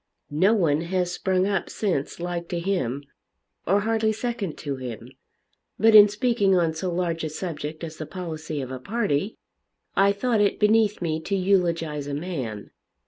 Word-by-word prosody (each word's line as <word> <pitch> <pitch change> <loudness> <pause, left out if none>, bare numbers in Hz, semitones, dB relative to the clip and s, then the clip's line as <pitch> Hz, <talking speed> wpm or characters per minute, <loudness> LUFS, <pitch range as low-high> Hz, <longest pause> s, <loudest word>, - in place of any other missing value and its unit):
No 190 +9 +4
one 160 -7 +2
has 180 +1 -1
sprung 185 +1 +1
up 200 -1 -1
since 175 -10 -2
like 175 -1 -3
to 175 - -2
him, 155 -8 -1 0.6
or 200 +4 +3
hardly 220 0 +1
second 220 -5 -3
to 140 -3 -4
him. 125 -3 -7 0.7
But 220 +2 +5
in 210 -1 +10
speaking 210 -2 +2
on 170 -3 +2
so 180 +3 -3
large 170 -2 -1
a 155 - -2
subject 155 -1 -5
as 160 -1 -6
the 155 - -6
policy 160 -5 -5
of 130 -1 -6
a 130 - -5
party, 200 - -1 0.6
I 195 +1 +5
thought 220 +2 +1
it 205 - +1
beneath 210 -2 +3
me 160 -2 -1
to 195 +5 -2
eulogise 170 -6 +1
a 140 - -3
man. 135 - -5
180 Hz, 170 wpm, -25 LUFS, 155-200 Hz, 0.7 s, in